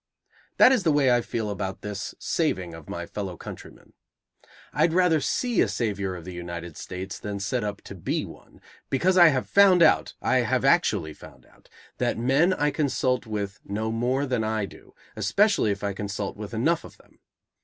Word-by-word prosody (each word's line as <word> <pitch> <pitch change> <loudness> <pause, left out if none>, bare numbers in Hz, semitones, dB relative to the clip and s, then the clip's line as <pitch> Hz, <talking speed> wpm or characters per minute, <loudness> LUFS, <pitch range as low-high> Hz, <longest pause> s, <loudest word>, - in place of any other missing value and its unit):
That 255 - +8
is 260 - +3
the 165 - +2
way 140 -3 +3
I 120 0 +4
feel 110 -2 -3
about 95 -1 -5
this 105 -1 -5
saving 95 - -1
of 80 -2 -11
my 85 0 -5
fellow 95 -2 -6
countrymen. - - -11 0.8
I'd 165 - +2
rather 175 -4 +3
see 245 - 0
a - - +3
savior 100 -5 -2
of 85 -2 -9
the 90 - -7
United 85 -2 -7
States 95 +2 -7
than 105 -1 -5
set 105 +5 -1
up 105 -1 -5
to - - -9
be 90 -4 -2
one; - - -15 0.3
because 180 +8 +2
I 175 -2 +8
have 135 -5 +1
found 190 -3 +6
out, - - +3
I 130 - +1
have 125 +2 +1
actually 105 - +2
found - - -15
out, - - -25 0.3
that - - 0
men 135 +9 +3
I 150 -5 +1
consult 130 -4 0
with 105 -2 -4
know 110 +2 -3
more 125 +5 0
than 125 -4 -1
I 110 -1 -1
do, - - -15 0.2
especially 110 - +2
if 100 0 -3
I 100 -1 -1
consult 100 0 -4
with 105 +1 -7
enough 160 +9 +1
of - - -13
them. - - -25
110 Hz, 190 wpm, -25 LUFS, 100-145 Hz, 0.8 s, That